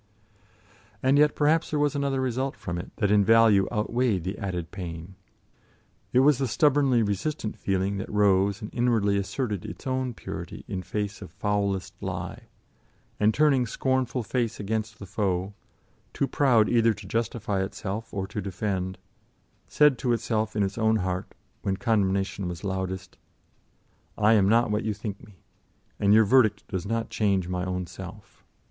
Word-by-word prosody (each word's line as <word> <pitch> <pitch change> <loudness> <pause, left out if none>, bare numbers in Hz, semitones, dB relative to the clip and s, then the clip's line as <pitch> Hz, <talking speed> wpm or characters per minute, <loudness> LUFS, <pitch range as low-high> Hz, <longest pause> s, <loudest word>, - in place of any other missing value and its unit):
And 135 +2 +4
yet 150 0 +4
perhaps 155 +2 +2
there 150 - -1
was 145 -1 +2
another 140 -2 0
result 130 +1 -1
from 85 0 -5
it 85 - -7
that 105 -1 +1
in 105 -1 +5
value 110 -2 +5
outweighed 110 -3 0
the 95 +3 -3
added 90 -4 -4
pain: 85 -1 -7 1.0
it 125 - +5
was 140 -1 +4
the 135 - 0
stubbornly 140 -3 +3
resistant 105 +4 -2
feeling 95 +1 -1
that 95 - -5
rose 100 0 +2
and 105 - -7
inwardly 115 -5 +2
asserted 105 0 -2
its - - -9
own 130 -2 -1
purity - - -7
in 95 - -3
face 105 +2 -4
of 95 - -8
foulest 100 -2 -1
lie, - - -5 0.7
and 105 +1 +4
turning 135 -2 +3
scornful 130 +1 -1
face 115 0 -2
against 110 +2 -3
the 100 - -9
foe, 95 0 -1 0.6
too - - 0
proud 125 -8 +3
either 115 -2 +3
to 105 0 -11
justify 110 -3 -1
itself 100 +3 -5
or 95 -1 -3
to 105 - -5
defend, 95 -1 -3 0.7
said 150 -4 +4
to 125 -3 +1
itself 110 -2 -1
in 105 - +2
its 100 +3 -3
own 110 0 +3
heart, 90 -3 -2 0.3
when 95 -1 -1
condemnation 100 -4 0
was 90 +1 -6
loudest: 95 -1 -4 1.0
"I 105 +1 +4
am 100 -3 +4
not 115 0 +3
what 105 +2 0
you 110 -2 -1
think 105 -1 -6
me, 95 -5 -17 0.6
and 100 -1 +3
your 110 +1 +7
verdict 110 -3 +3
does 95 +1 -3
not 115 +1 -2
change 100 -4 +1
my 90 0 -2
own 90 0 -2
self. 95 +3 -11
105 Hz, 165 wpm, -26 LUFS, 95-120 Hz, 1.0 s, your